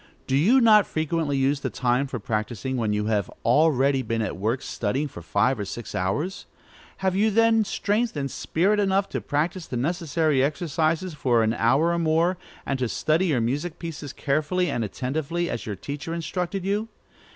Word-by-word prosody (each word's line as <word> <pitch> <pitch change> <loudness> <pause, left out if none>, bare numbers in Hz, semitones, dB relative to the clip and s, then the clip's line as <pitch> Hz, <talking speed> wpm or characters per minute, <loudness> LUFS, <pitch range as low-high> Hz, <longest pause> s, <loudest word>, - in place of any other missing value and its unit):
Do 130 - 0
you 205 - +5
not 215 -5 +6
frequently 155 -2 -1
use 135 +1 +2
the - - -3
time 125 +2 0
for 130 - -4
practising, 110 +4 -3
when 115 -4 0
you 105 0 0
have 105 -3 0 0.2
already 135 0 +3
been 115 -2 -1
at - - -3
work 110 +7 -1
studying 130 +7 -2
for 105 - -10
five 105 +8 +1
or - - -1
six 120 +4 -7
hours? 145 - -2 0.6
Have 190 -1 +2
you 210 +3 +3
then 225 +1 +4
strength 210 0 -1
and 140 -1 -2
spirit 200 +6 +1
enough 195 0 +1
to - - -3
practise 160 +4 -2
the 125 - -4
necessary 155 -1 +1
exercises 160 +3 0
for 125 -6 +2
an 110 0 +1
hour 130 +9 +3
or 170 - 0
more, 165 +3 +2 0.3
and 135 -1 -2
to 125 -2 0
study 160 +9 +1
your 135 -8 +1
music 145 +8 -2
pieces 155 -4 -6
carefully 155 +5 0
and 120 - -1
attentively, 155 - -2
as 115 - -5
your 105 - -3
teacher 145 - -5
instructed 180 +2 -3
you? 205 +3 0
150 Hz, 185 wpm, -25 LUFS, 125-175 Hz, 0.6 s, not